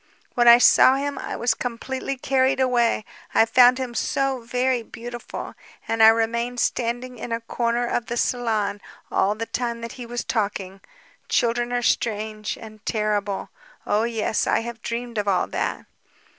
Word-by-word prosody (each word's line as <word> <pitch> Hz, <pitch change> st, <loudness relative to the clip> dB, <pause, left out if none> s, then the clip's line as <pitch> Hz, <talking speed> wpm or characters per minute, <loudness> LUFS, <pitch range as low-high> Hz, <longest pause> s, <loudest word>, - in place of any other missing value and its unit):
When 240 Hz, -1 st, +3 dB
I 235 Hz, 0 st, +10 dB
saw 255 Hz, +1 st, +6 dB
him 285 Hz, +1 st, -3 dB
I -, -, -5 dB
was 240 Hz, -, +1 dB
completely 260 Hz, +3 st, -4 dB
carried 265 Hz, 0 st, +1 dB
away, 240 Hz, -4 st, +2 dB, 0.3 s
I 225 Hz, -, +6 dB
found 250 Hz, +2 st, +6 dB
him 255 Hz, -2 st, -4 dB
so 270 Hz, +2 st, 0 dB
very 250 Hz, +1 st, 0 dB
beautiful; 240 Hz, +1 st, -8 dB, 0.3 s
and 225 Hz, 0 st, 0 dB
I 220 Hz, -, +9 dB
remained 235 Hz, +2 st, +2 dB
standing 245 Hz, +1 st, -2 dB
in 235 Hz, -, -6 dB
a 230 Hz, -, 0 dB
corner 235 Hz, +1 st, -1 dB
of 240 Hz, -1 st, -2 dB
the 240 Hz, -, -3 dB
salon 215 Hz, -5 st, 0 dB, 0.3 s
all 205 Hz, +2 st, +2 dB
the 225 Hz, +1 st, -4 dB
time 235 Hz, 0 st, -3 dB
that 230 Hz, -, -6 dB
he 245 Hz, -2 st, -9 dB
was 240 Hz, 0 st, -4 dB
talking. 200 Hz, -3 st, -3 dB, 0.5 s
Children 240 Hz, +1 st, +1 dB
are 245 Hz, 0 st, -1 dB
strange... 215 Hz, -2 st, -1 dB
and 215 Hz, -1 st, -12 dB
terrible. 210 Hz, -2 st, -1 dB, 0.3 s
Oh 210 Hz, -, +1 dB
yes... 225 Hz, -2 st, -1 dB
I -, -, +2 dB
have 235 Hz, 0 st, -7 dB
dreamed 235 Hz, -1 st, -4 dB
of 205 Hz, -, -2 dB
all 190 Hz, -2 st, +2 dB
that. -, -, -3 dB
235 Hz, 165 wpm, -23 LUFS, 220-245 Hz, 0.5 s, I